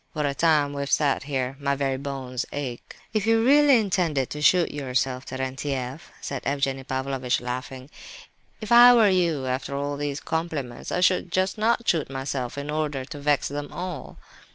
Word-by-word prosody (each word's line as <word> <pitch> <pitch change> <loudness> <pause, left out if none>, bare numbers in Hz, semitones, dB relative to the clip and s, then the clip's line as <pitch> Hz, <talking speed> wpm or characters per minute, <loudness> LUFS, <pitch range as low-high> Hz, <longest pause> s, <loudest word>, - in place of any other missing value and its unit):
What 150 -2 -1
a 140 - 0
time 150 -2 +2
we've 140 0 -4
sat 140 -3 +2
here, 135 -2 -2
my 140 -1 0
very 135 -1 -1
bones 130 -2 -4
ache!" 130 -4 -6 0.2
"If 215 0 0
you 225 0 +3
really 285 -1 +6
intended 175 - 0
to 150 - -5
shoot 175 +4 +4
yourself, 130 -2 -2
Terentieff," 130 +1 -4
said 135 -2 -4
Evgenie 135 -1 -1
Pavlovitch, 130 -1 -1
laughing, 130 +1 -6 0.7
"if 215 - -7
I 240 +1 +9
were 220 -3 +5
you, 170 -7 +1
after 130 +2 -3
all 145 +1 -2
these 145 -1 -3
compliments, 160 -7 -4
I 180 - 0
should 180 -1 +2
just 185 +1 +1
not 230 +2 +1
shoot 160 -5 +1
myself 135 -1 -4
in 140 +1 -4
order 150 -4 -2
to 145 - -8
vex 145 0 +1
them 145 +1 -5
all." 175 -3 -6
145 Hz, 175 wpm, -25 LUFS, 130-170 Hz, 0.7 s, I